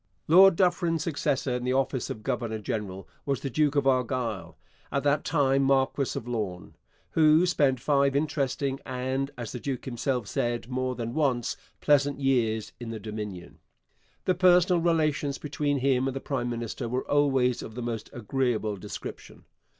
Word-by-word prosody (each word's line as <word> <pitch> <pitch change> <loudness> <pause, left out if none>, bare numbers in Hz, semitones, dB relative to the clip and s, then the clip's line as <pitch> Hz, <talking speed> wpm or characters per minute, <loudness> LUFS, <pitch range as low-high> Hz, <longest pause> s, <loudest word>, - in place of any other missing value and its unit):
Lord 190 +3 +8
Dufferin's 175 -3 +1
successor 145 -5 -1
in 125 0 -2
the 125 +1 0
office 135 -1 0
of 110 - -6
governor 110 +1 -2
general 100 -2 -4 0.2
was 140 -3 -1
the 135 - -4
Duke 150 +1 +2
of 140 -1 +2
Argyll, 120 -10 0 0.3
at 140 - 0
that 145 +1 +2
time 140 -3 +2
Marquess 135 0 +1
of 115 - -5
Lorne, 105 -7 -4 0.4
who 155 +2 +5
spent 145 -8 +2
five 140 0 +2
interesting 140 -2 -1
and, 130 +1 -2
as 120 -3 -5
the 125 - -5
duke 135 +1 -4
himself 125 -1 -2
said 120 +3 -2
more 130 0 -2
than 115 -1 -4
once, 130 -6 0 0.3
pleasant 145 -1 +3
years 115 -5 +1
in 120 -2 -6
the 115 -1 -5
Dominion. 105 -4 -7 0.7
The 185 - +3
personal 180 -1 +4
relations 155 -4 +1
between 145 -1 -1
him 130 -1 +2
and 135 - -3
the - - -2
prime 130 -4 -2
minister 120 +1 -4
were 125 +2 -2
always 135 -4 +2
of 110 - -9
the 125 - -4
most 115 -2 -4
agreeable 115 -3 -1
description. - - -9
130 Hz, 165 wpm, -27 LUFS, 120-145 Hz, 0.7 s, Lord